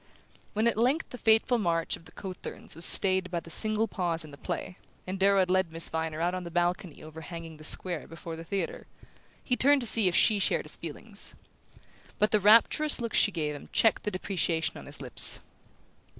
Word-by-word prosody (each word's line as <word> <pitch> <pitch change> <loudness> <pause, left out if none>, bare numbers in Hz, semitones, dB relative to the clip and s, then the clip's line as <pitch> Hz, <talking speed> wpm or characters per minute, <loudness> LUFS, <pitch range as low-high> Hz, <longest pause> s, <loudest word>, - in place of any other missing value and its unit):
When 215 +2 0
at 230 - +1
length 265 +7 +1
the 250 - -8
fateful 225 +3 +3
march 165 -4 0
of 165 - -17
the - - -14
cothurns 185 -5 -7
was 165 - +5
stayed 190 -1 +4
by 175 -1 -2
the 165 - -10
single 215 +4 +4
pause 170 -5 -2
in 150 - -13
the - - -11
play, 180 - -5 0.3
and 185 +1 -5
Darrow 200 +1 +4
had 180 -1 0
led 185 -3 +1
Miss 165 +1 +4
Viner 160 -1 -3
out 175 +2 0
on 185 0 -4
the 170 - -7
balcony 175 -1 -2
overhanging 160 +1 -9
the 155 - -14
square 175 +1 -1
before 165 0 -8
the 165 - -9
theatre, 185 +1 -4 0.6
he 250 - 0
turned 280 +2 +4
to - - -2
see 220 -3 +2
if 175 - 0
she 215 -2 +3
shared - - 0
his - - -4
feelings. - - -3 0.8
But 210 - +1
the 215 - +3
rapturous 230 +9 +4
look 230 -2 -4
she 205 - +3
gave 155 -4 -3
him 145 - -11
checked 225 - +2
the - - -3
depreciation 180 -4 -2
on - - -10
his - - -7
lips. - - +3
185 Hz, 205 wpm, -28 LUFS, 165-215 Hz, 0.8 s, was